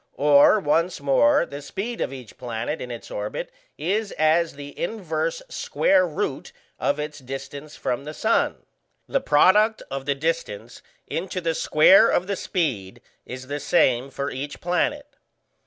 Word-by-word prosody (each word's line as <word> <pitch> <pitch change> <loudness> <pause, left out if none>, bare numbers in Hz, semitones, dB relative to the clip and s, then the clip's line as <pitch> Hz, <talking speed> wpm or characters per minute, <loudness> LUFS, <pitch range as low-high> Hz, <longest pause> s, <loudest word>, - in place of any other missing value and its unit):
Or, 145 +8 +6
once 165 +1 0
more, 135 -4 +3
the 140 +1 -8
speed 225 +10 -5
of - - -1
each 130 -5 -10
planet 120 +5 -4
in 125 - -6
its 120 -1 -8
orbit 105 +1 -4 0.3
is 200 +7 -1
as 160 +2 +2
the 145 0 -9
inverse 225 - -3
square 190 - +2
root 155 - -4 0.3
of 145 - 0
its 150 0 -5
distance 135 +3 -8
from 125 +2 -3
the 150 +1 -7
sun. 225 +1 0 0.4
The 275 - 0
product 210 - +4
of 135 0 -5
the 140 - +1
distance 155 -8 -3 0.2
into 185 +2 -4
the 165 -2 -1
square 185 +8 +5
of 180 - +1
the 200 +1 -2
speed 130 - -2 0.3
is 130 +1 -7
the 145 +2 -4
same 130 -6 +2
for 140 +1 -4
each 145 +2 -6
planet. 180 - -1
150 Hz, 155 wpm, -24 LUFS, 135-185 Hz, 0.4 s, Or